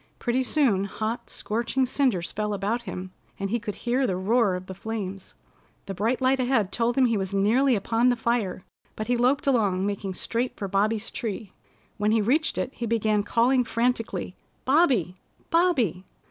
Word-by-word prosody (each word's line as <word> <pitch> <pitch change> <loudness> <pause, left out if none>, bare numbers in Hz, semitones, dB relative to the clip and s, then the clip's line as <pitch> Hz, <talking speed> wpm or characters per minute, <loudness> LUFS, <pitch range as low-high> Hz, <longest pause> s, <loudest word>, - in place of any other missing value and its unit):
Pretty 250 +1 0
soon 240 -9 +2
hot, 220 +4 -4
scorching 235 +4 -1
cinders 245 -10 0
fell 210 0 -2
about 205 +5 -1
him, 185 0 -6 0.3
and 195 0 -3
he 235 - +1
could 210 -2 -5
hear 250 +2 0
the 185 - 0
roar 205 +1 +2
of 180 0 -6
the 190 - -7
flames. 195 -1 -6 0.5
The 195 - -5
bright 225 +7 0
light 260 +1 +2
ahead 245 -6 +1
told 240 +2 0
him 265 - +5
he 230 -3 +2
was 190 +1 -3
nearly 240 +7 +3
upon 225 +4 +2
the 245 - +3
fire, 225 -6 -1 0.3
but 215 - -4
he 245 - +1
loped 255 +4 +2
along, 205 -8 +2
making 200 -2 -3
straight 235 +6 -2
for 200 - -3
Bobby's 210 +3 0
tree. 215 -3 -5 0.4
When 210 0 +1
he 225 - +3
reached 275 +10 +1
it 260 - -2
he 235 - -4
began 215 -2 +1
calling 245 +4 +2
frantically. 230 -6 -1 0.3
"Bobby! 260 - +3 0.4
Bobby!" 275 - +2
225 Hz, 175 wpm, -26 LUFS, 200-250 Hz, 0.5 s, him